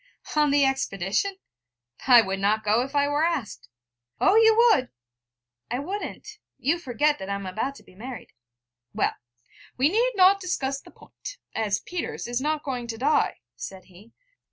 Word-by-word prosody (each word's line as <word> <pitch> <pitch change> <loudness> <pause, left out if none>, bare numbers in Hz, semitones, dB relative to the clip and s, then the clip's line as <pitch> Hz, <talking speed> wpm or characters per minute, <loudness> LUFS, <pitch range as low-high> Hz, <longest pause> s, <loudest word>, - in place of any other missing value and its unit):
on 300 -1 +4
the 285 0 +4
expedition? 270 - -1 0.7
I 245 -3 +8
would 195 -1 -3
not 210 +2 +1
go, 215 +3 +3
if 270 +3 -5
I 285 0 +3
were 290 +2 +1
asked.' 325 - -2 0.5
'Oh, 385 - +4
you 445 0 +6
would.' 455 - +4 0.8
'I 245 - -1
wouldn't. 410 +6 -6 0.2
You 330 +5 0
forget 295 +1 +1
that 190 - -6
I 200 - -1
am 200 -1 -6
about 220 +9 -3
to - - -15
be - - -19
married.' 245 +6 -9 0.6
'Well, - - +1 0.6
we 270 +4 +4
need 475 +7 +2
not 385 +1 +6
discuss 275 -7 -2
the - - -16
point, - - -11 0.2
as 210 -3 -1
Peters 355 -1 -5
is 240 +1 -2
not 305 +1 -1
going 250 -3 -4
to 225 -1 -5
die,' 285 +6 +1
said 190 -1 -8
he. 205 +6 -17
275 Hz, 170 wpm, -25 LUFS, 225-340 Hz, 0.8 s, I